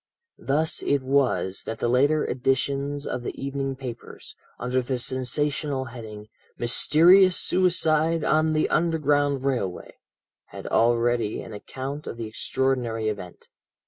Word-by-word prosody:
"Thus 155 +4 0
it 140 -2 0
was 130 -8 +1
that 110 - -4
the - - -1
later 140 +5 +3
editions 140 +3 -1
of 125 - -3
the 120 - -6
evening 135 0 -3
papers, 125 -3 -9 0.2
under 125 +1 -1
the 125 +1 -2
sensational 130 +2 -2
heading, 105 -3 -9 0.3
'Mysterious 175 +10 +5
Suicide 165 -3 +2
on 155 +2 +2
the 155 - +2
Underground 145 -4 +1
Railway,' 120 -10 -3 0.5
had - - -11
already 120 -1 +1
an 115 - -10
account 135 +7 -7
of - - -6
the 115 - -4
extraordinary 115 -1 -1
event. 95 -4 -8
135 Hz, 125 wpm, -25 LUFS, 120-150 Hz, 0.5 s, Mysterious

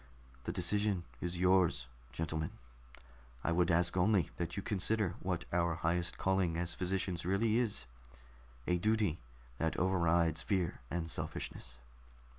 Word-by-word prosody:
"The - - -1
decision 100 +1 +1 0.2
is 90 0 -3
yours, 90 -6 +3 0.3
gentlemen, 80 +3 -2 0.9
I - - +1
would 85 +1 +3
ask 85 +1 +3
only 95 -1 +3
that 85 +1 -3
you 100 - -2
consider 105 -2 +1
what 90 -2 -2
our 85 -1 +2
highest 85 +2 0
calling 95 -3 +1
as 90 0 -1
physicians 90 -1 -1
really 105 +5 +2
is 105 - 0 0.8
a 90 0 +1
duty 105 -4 +2 0.4
that 80 -1 0
overrides 85 -3 +2
fear 90 0 -1
and 80 -1 -2
selfishness. 60 -5 -5
90 Hz, 130 wpm, -34 LUFS, 85-95 Hz, 0.9 s, yours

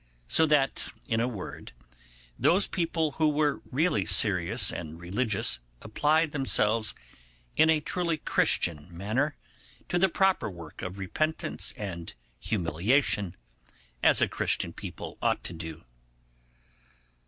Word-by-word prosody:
So 160 - +4
that, 145 -3 +2 0.2
in 115 -1 +1
a 120 - +2
word, 105 -7 -7 0.7
those 190 +4 +4
people 165 -3 0
who 155 -1 +4
were 150 -1 +1
really 140 - +2
serious 95 +2 +3
and 80 -1 -6
religious 95 - -1 0.2
applied 150 - +2
themselves 115 -6 +1 0.6
in 160 - +5
a 155 -1 +4
truly 170 +1 -1
Christian 80 - +1
manner 110 - -1 0.5
to 175 - +1
the 190 +1 +4
proper 190 - +2
work 85 -5 -10
of 95 +1 -5
repentance 155 - -2
and 85 -5 -6 0.2
humiliation, 95 - +1 0.7
as - - +5
a - - +5
Christian - - -1
people - - -8
ought - - +1
to - - -5
do. 80 -1 -7
115 Hz, 120 wpm, -28 LUFS, -, 0.7 s, in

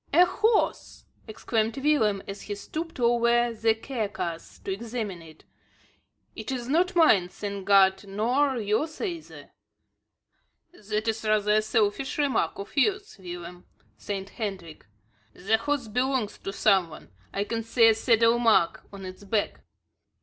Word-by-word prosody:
"A 350 +4 +6
horse!" 435 +4 0 0.2
exclaimed 220 +1 -2
Willem 265 -9 +1
as 195 0 -7
he 205 - -5
stooped 320 +9 -6
over 240 0 +3
the 225 0 +2
carcass 210 -8 -5
to 195 - -2
examine 220 -4 -5
it. 160 -1 -15 0.9
"It - - -6
is 245 -2 -4
not 355 +7 +1
mine, 210 - +5
thank 200 0 -6
God, 190 -1 +5
nor 250 +7 +1
yours 230 +9 -1
neither." 340 -6 -6 1.2
"That 215 - -4
is 225 0 -1
rather 215 -1 +2
a 215 - +4
selfish 215 +4 0
remark 285 -3 0
of 200 - -8
yours, 400 - 0
Willem," 175 -1 -9 0.3
said 195 -1 -5
Hendrik. 190 - -6 0.5
"The 220 +4 +1
horse 280 0 -2
belongs 250 0 -1
to 195 - -5
some 195 -4 +3
one. 155 - -13 0.2
I 200 - -1
can 225 +2 -3
see 230 +1 +4
a 225 - +6
saddle 230 +1 +3
mark 225 -8 +3
on 195 -1 -9
its 185 +2 -9
back." 205 +1 -1
220 Hz, 140 wpm, -26 LUFS, 200-250 Hz, 1.2 s, A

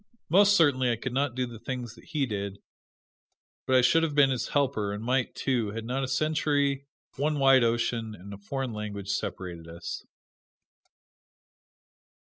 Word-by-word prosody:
Most 200 +4 +6
certainly 130 -8 +4
I - - +1
could 120 +2 -5
not 135 -1 0
do 130 0 0
the 120 -2 -9
things 120 -1 -5
that - - -17
he 150 -4 -1
did, 100 -4 -4 1.1
but 130 - +3
I 130 - +7
should 165 +6 +4
have 160 -3 -1
been 140 -2 +5
his 125 - -1
helper, 130 -8 0
and 105 +2 -5
might, 125 +1 0
too, 120 -6 0
had 115 0 -5
not 130 +3 -2
a - - -1
century, 140 -1 0 0.3
one 150 +2 0
wide 135 -2 +6
ocean, 115 -1 0
and 100 +2 -10
a - - -8
foreign 130 +3 -4
language 100 -2 -5
separated 85 -5 -4
us. 85 +1 -6
125 Hz, 165 wpm, -28 LUFS, 110-140 Hz, 1.1 s, I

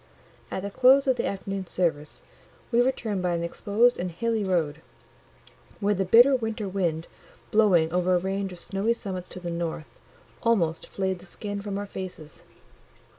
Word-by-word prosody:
At 190 - -4
the 200 - -4
close 260 +5 +5
of 260 -2 +2
the - - 0
afternoon 195 -1 -4
service 155 -5 -2 0.5
we 235 0 +4
returned 230 -6 0
by 180 -1 0
an 170 - -2
exposed 215 +7 +2
and 180 +1 -2
hilly 220 +5 -1
road, 165 -5 0 1.0
where 205 -1 +2
the 195 -1 -1
bitter 240 +8 +7
winter 225 -4 -3
wind, 170 -4 -1 0.5
blowing 180 -7 +4
over 180 0 +2
a - - +3
range 195 +1 -2
of 180 - -9
snowy 195 +6 0
summits 190 -6 -6
to - - -7
the 175 -1 -5
north, 170 -2 -5 0.4
almost 175 -9 +1
flayed 190 -2 -2
the 180 - -14
skin 205 +1 -5
from 200 -1 -4
our 205 - -3
faces. 185 -6 -8
195 Hz, 170 wpm, -26 LUFS, 175-215 Hz, 1.0 s, bitter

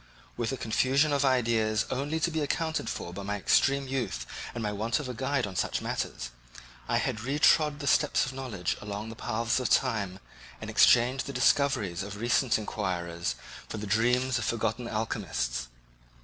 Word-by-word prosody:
With 120 -2 -2
a 135 - -3
confusion 135 +6 +2
of 140 0 +2
ideas 115 -5 +2
only 145 +5 -1
to 170 - +1
be 160 - -1
accounted 160 +2 -1
for 85 - -5
by 100 - -6
my 100 +1 -2
extreme 135 +7 +2
youth 120 - -2 0.3
and 120 - -3
my 105 - -1
want 110 +5 -1
of 145 - -5
a 125 - -4
guide 135 +3 0
on 95 -2 -7
such - - 0
matters, - - -3 0.6
I - - +3
had - - -1
retrod 145 +4 +3
the 145 - -6
steps 145 +1 +3
of 130 - -6
knowledge 120 -10 -3
along 105 +1 -5
the 115 - -8
paths 115 +1 0
of 125 - -1
time 100 -4 +1 0.4
and - - -6
exchanged 125 +2 +5
the 140 - -5
discoveries 105 -14 +2
of 100 +1 -6
recent 120 +2 +2
inquirers 90 -5 -3 0.3
for - - -4
the 105 - -5
dreams 120 +4 +2
of 115 - -2
forgotten 115 +1 -1
alchemists. - - -2
115 Hz, 175 wpm, -29 LUFS, 105-135 Hz, 0.6 s, exchanged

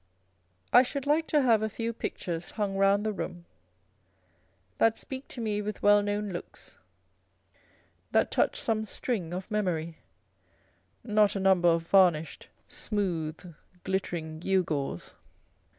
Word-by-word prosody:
I 245 - +9
should 275 +2 -3
like 310 +3 +2
to 295 -3 +3
have 230 -4 +4
a 220 - -1
few 230 +2 -3
pictures 175 -6 -4
hung 205 -3 -2
round 195 +1 +3
the 215 - 0
room 175 -3 -6 1.3
that 225 0 +4
speak 265 +1 -7
to 255 - -9
me 210 -2 -1
with 210 0 -5
well 205 0 +6
known 205 0 -2
looks, 175 - -8 1.3
that - - +2
touch - - +1
some 220 -1 0
string 205 -6 -3
of 185 +3 -5
memoryâ€" 175 -6 -1 1.1
not 210 -2 +3
a - - -1
number 190 -2 +4
of 165 0 +1
varnished, 170 -4 +3 0.2
smooth, 175 -5 -3 0.3
glittering 170 -5 -3
gewgaws. 160 - -1
200 Hz, 130 wpm, -28 LUFS, 175-215 Hz, 1.3 s, I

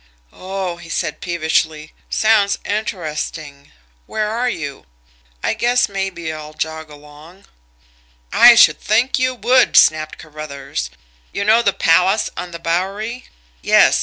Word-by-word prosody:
"Oh!" 185 -2 -5
he 170 -1 -13
said - - -3
peevishly. 160 -2 -1 0.2
"Sounds 215 -2 +2
interesting. 155 -8 -5 0.4
Where 215 -1 -2
are 245 +3 -1
you? 145 - -6 0.6
I - - +1
guess 245 +1 +1
maybe 195 -5 -4
I'll 155 0 -9
jog 160 0 -5
along." 150 +5 -15 0.9
"I - - +8
should - - +5
think 235 +6 +1
you 255 0 0
would!" 250 +3 +3
snapped 155 0 +4
Carruthers. 140 - -7 0.4
"You 200 - -3
know 220 +3 +5
the 200 - +2
Palace 185 +5 +2
on 180 - -6
the 170 - -8
Bowery? 195 +9 -3 0.4
Yes? - - +4
175 Hz, 130 wpm, -18 LUFS, 155-215 Hz, 0.9 s, I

